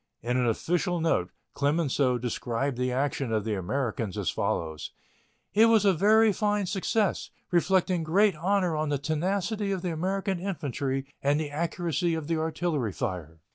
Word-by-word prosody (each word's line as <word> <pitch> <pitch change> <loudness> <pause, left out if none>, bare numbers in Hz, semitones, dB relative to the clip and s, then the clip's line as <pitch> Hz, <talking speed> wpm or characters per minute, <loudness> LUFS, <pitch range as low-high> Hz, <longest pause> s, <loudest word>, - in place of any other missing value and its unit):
In 120 +1 -1
an 125 -1 +2
official 175 - 0
note 160 - +1 0.2
Clemenceau 140 -3 +1
described 120 +2 -2
the 125 +1 -1
action 135 -1 -1
of 110 -2 0
the 110 - -1
Americans 110 +1 -2
as - - 0
follows: 80 -2 -3 0.6
"It 220 +2 +6
was 220 -2 +4
a 195 - +5
very 215 +4 +4
fine 210 0 0
success, 200 +2 0 0.2
reflecting 180 0 +2
great 190 +5 +3
honor 180 +1 +1
on 155 0 -1
the 145 - +1
tenacity 190 +8 -1
of 190 -2 -2
the 180 - -1
American 190 +3 -1
infantry 140 -7 -3 0.2
and 145 +2 +2
the 150 -2 -3
accuracy 170 +1 -1
of 160 -2 -4
the 165 +1 0
artillery 160 - -1
fire." 80 -4 -5
160 Hz, 160 wpm, -27 LUFS, 130-190 Hz, 0.6 s, It